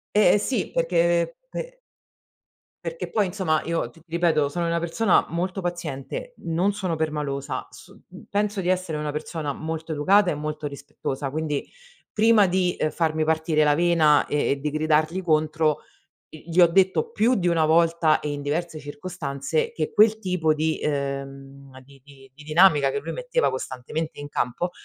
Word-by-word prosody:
Eh, 210 - +6
e - - +5
sì 220 +1 -1
perché 170 0 +1
pe - - -7 1.1
perché - - -4
poi 210 -3 +1
insomma 180 -5 0
io 170 0 -2
t 165 - -20
ripeto 165 -3 +1
sono 170 +3 -2
una 170 0 0
persona 170 +4 +2
molto 185 +3 -2
paziente, 175 - -5
non 175 +5 0
sono 185 -5 -2
permalosa, 150 -3 -3
so - - -16 0.3
penso 205 0 -1
di 180 - -2
essere 185 -4 0
una 150 -1 -3
persona 150 -1 -4
molto 160 +2 -5
educata 185 +6 +4
e - - -2
molto 150 0 -4
rispettosa 140 -1 -5
quindi 150 -1 -2 0.5
prima 220 -1 +5
di 180 -1 +1 0.2
farmi 160 -2 0
partire 160 0 +1
la 150 -1 +4
vena 160 -3 +4
e 145 0 0
e 140 - -1
di 150 +2 -2
gridargli 155 +3 +1
contro 155 -2 +1 0.6
gli 165 +3 -6
ho 175 - +9
detto 190 - +2
più 245 - +2
di 180 - -1
1 170 -2 +3
volta 165 0 +3
e 150 - -4
in 145 0 -5
diverse 155 +2 -3
circostanze 145 - -3
che 465 - -3
quel 220 +1 +5
tipo 180 -6 +1
di 155 +1 -1
ehm, 140 -1 -4
di 135 +1 -19
di 135 -2 -17
di 150 - -14
dinamica 155 -2 +4
che 140 - -2
lui 160 +4 -5
metteva 205 - 0
costantemente 130 +4 -5
in 145 0 -7
campo 145 +6 -2
160 Hz, 165 wpm, -24 LUFS, 150-180 Hz, 1.1 s, ho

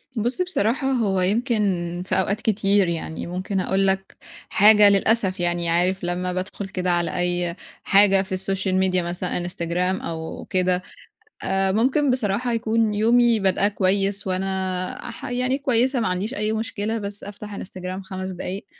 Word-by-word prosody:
بُصّ 240 - -1
بصراحة 270 - 0
هو 200 -7 +1
يمكن 195 -5 0
في - - -1
أوقات 200 +3 -1
كتير، 200 -3 +2
يعني 165 -1 -4
ممكن 185 +2 -3
اقول 195 +1 +1
لك 190 0 -2 0.3
حاجة 210 0 +7
للأسف 200 -1 +2
يعني 175 -1 0
عارف 180 +2 +1
لمّا 180 +1 -2
بادخل 190 +2 -4
كده 185 -1 -2
على 175 0 0
أي 175 -1 -1 0.3
حاجة 195 -1 +5
في 190 -1 -4
الSocial 190 0 0
media - - +2
مثلًا، 175 +1 -3
إنستجرام 175 +1 -1
أو 160 -1 -6
كده، 185 -1 +1 0.6
آآ 190 0 +1
ممكن 260 +6 +2
بصراحة 240 0 0
يكون 225 -1 +1
يومي 235 +2 +4
بادأه 195 0 +2
كويس، 195 0 0
وأنا 185 -1 -3
ح - - -9
يعني 255 +2 -1
كويسة 260 -1 +1
ما 225 - 0
عنديش 185 +6 -2
أي 215 -3 -1
مشكلة، 220 0 -2
بس 200 -1 -5
أفتح 205 +1 -8
إنستجرام 185 -1 -6
5 190 0 -6
دقايق، 185 +2 -6
195 Hz, 155 wpm, -23 LUFS, 185-215 Hz, 0.6 s, حاجة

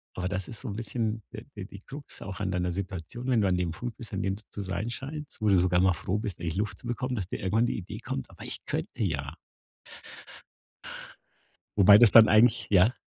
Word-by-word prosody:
Aber 90 0 -2
das 95 -1 -3
ist 115 - -7
so 130 - -7
'n 100 - -5
bisschen 115 -1 -2
d 110 - -8
die 100 -2 -6
die 100 - -11
Krux 140 +4 -10
auch 95 0 -6
an 95 -2 -1
deiner 90 -1 0
Situation, 95 +6 -5
wenn 120 -4 +3
du 100 - +2
an 90 -1 +2
dem 90 -2 -1
Punkt 120 +7 -6
bist, 115 -5 -9
an 95 - -1
dem 95 0 0
du 105 - -14
zu 100 - -5
sein 100 +4 -3
scheinst, 140 +2 -7
wo 105 - +3
du 95 -3 +5
sogar 90 0 +3
mal 95 0 +4
froh 95 +6 -2
bist, 100 -5 -4
endlich 85 -1 -3
Luft 100 -2 -2
zu 120 - -9
bekommen, 125 +1 -2
dass 95 -5 -3
dir - - -5
irgendwann 105 +5 +2
die - - -1
Idee 90 - -7
kommt: 65 - -5
„Aber - - -12
ich - - -6
könnte - - -3
ja.“ 70 -4 -2 2.4
Wobei 100 +1 +9
das 120 -3 +7
dann 110 -2 +9
eigentlich 110 +2 +4
ja? 95 +6 +5
100 Hz, 235 wpm, -28 LUFS, 90-115 Hz, 2.4 s, Wobei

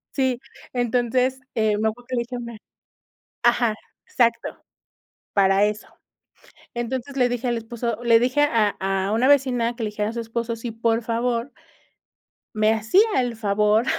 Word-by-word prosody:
Sí, 260 -3 +1 0.3
entonces, 250 +2 +1 0.2
eh, 220 -2 +2
me 220 - +1
acuerdo 240 +3 -10
que 260 - -3
le - - +1
dije 245 +1 -6
hombre 235 -2 -8 0.8
Ajá, 240 -2 +3 0.3
exacto. 235 -1 0 0.7
Para 195 0 +4
eso. 210 0 -3 0.8
Entonces 245 +3 -4
le 250 -2 +3
dije 245 +1 -2
al 240 -1 0
esposo 230 0 -4
le 230 -1 +6
dije 255 +5 +1
a 230 -8 +2
a 195 +1 -1
una 230 +4 +2
vecina 250 -4 +3
que 235 - -5
le 215 - -2
dijera 210 0 -2
a - - -6
su 235 - -4
esposo 230 0 -3
si 230 +1 -6
por 225 +1 0
favor 235 +3 -1 1.0
me 215 0 +3
hacía 220 - +3 0.2
el 245 -2 -1
favor 210 +1 +2
235 Hz, 160 wpm, -23 LUFS, 220-245 Hz, 1.0 s, le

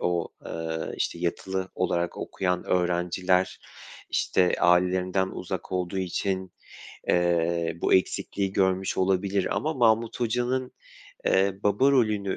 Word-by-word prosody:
o, 85 -1 0 0.2
ııı, 80 -1 -4
işte, 85 - -2
yatılı 95 +2 -2
olarak 85 -1 -1
okuyan 90 -1 -2
öğrenciler, 90 +1 +1 0.5
işte, 90 -1 +2
ailelerinden 90 +2 +3
uzak - - -6
olduğu 90 +1 -2
için, 95 0 -2 0.6
eee, 85 -1 +1
bu - - +2
eksikliği 95 +1 0
görmüş 95 -1 +1
olabilir 95 +1 +1
ama 155 +1 -1
Mahmut 115 -1 +2
Hoca'nın, 125 +2 0 0.6
eee, 95 0 +3
baba 105 +7 +3
rolünü 105 -7 +1
95 Hz, 110 wpm, -26 LUFS, 90-100 Hz, 0.6 s, ailelerinden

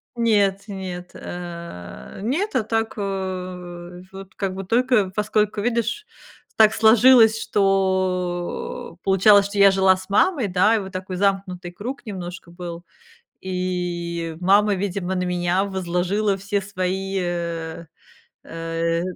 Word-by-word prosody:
Нет, 200 -4 +2
нет, 185 -3 -6
э, 170 - -8
нет, 330 - -1
а 225 - +2
так, 225 0 -1
а, 180 -3 -5
вот 195 0 -11
как 195 -2 -2
бы 195 - -5
только 235 -2 +2
поскольку, 210 0 0
видишь, 235 - -1 0.5
так 220 0 +6
сложилось, 225 0 +6
что 185 -3 -1
получалось, 200 +1 +5
что 200 0 -7
я 200 -1 +7
жила 190 -1 +4
с 185 +1 -11
мамой, 250 - +2
да, 190 +5 +3
и - - +1
вот 190 -1 -7
такой 185 0 -5
замкнутый 190 -2 -1
круг 245 +8 -7
немножко 180 -3 -7
был. 175 -1 -7 0.6
И 175 -3 -3
мама, 200 +3 +4
видимо, 190 -1 -2
на 180 0 -1
меня 180 +2 0
возложила 190 +2 -1
все 200 +1 -2
свои, 190 0 -2
э, 170 -2 -4 0.6
э, 165 0 -2
190 Hz, 125 wpm, -22 LUFS, 175-205 Hz, 0.6 s, я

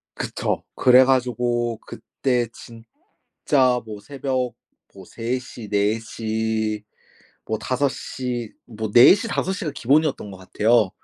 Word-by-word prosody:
그쵸. - - -3
그래 130 0 +6
가지고 120 -2 0
그때 125 -3 -2 0.8
진짜 130 -4 +1
뭐 105 -2 -8
새벽 130 -1 -3 0.4
뭐 95 -2 -13
3 120 +2 -3
시, 120 -4 -10
4 105 +2 +1
시, 110 -1 -2 0.6
뭐 110 -1 -2
5 135 +2 0
시 120 -5 -5
뭐 110 -2 -5
4 120 +9 +9
시, 225 +2 -4
5 190 - -1
시가 180 -6 -3
기본이었던 140 -3 +1
것 95 - -9
같아요. 105 +2 +2
120 Hz, 175 characters per minute, -22 LUFS, 110-130 Hz, 0.8 s, 4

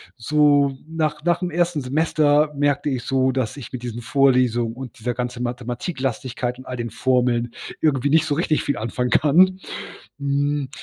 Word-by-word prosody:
so 145 +1 +3
nach 155 -2 -2
nach 175 0 +2
dem 180 -1 -2
1. 170 -3 0
Semester 150 +2 +2
merkte 145 0 +1
ich 125 -3 -2
so, 130 0 +1
dass 130 +1 -2
ich 125 -1 -9
mit 125 - -5
diesen 120 0 -5
Vorlesungen 125 -4 +2
und 130 -2 -9
dieser 120 +2 -2
ganze 125 0 -4
Mathematiklastigkeit 125 0 -3
und 130 - -11
all 125 -1 -5
den 120 -2 -4
Formeln 120 -1 +1 0.3
irgendwie 145 -3 +2
nicht 155 0 +4
so 145 -2 0
richtig 160 -1 +1
viel 140 - -1
anfangen 125 +2 -2
kann. 180 +9 +4 0.6
Hm, 140 -1 0
135 Hz, 165 wpm, -22 LUFS, 125-150 Hz, 0.6 s, nicht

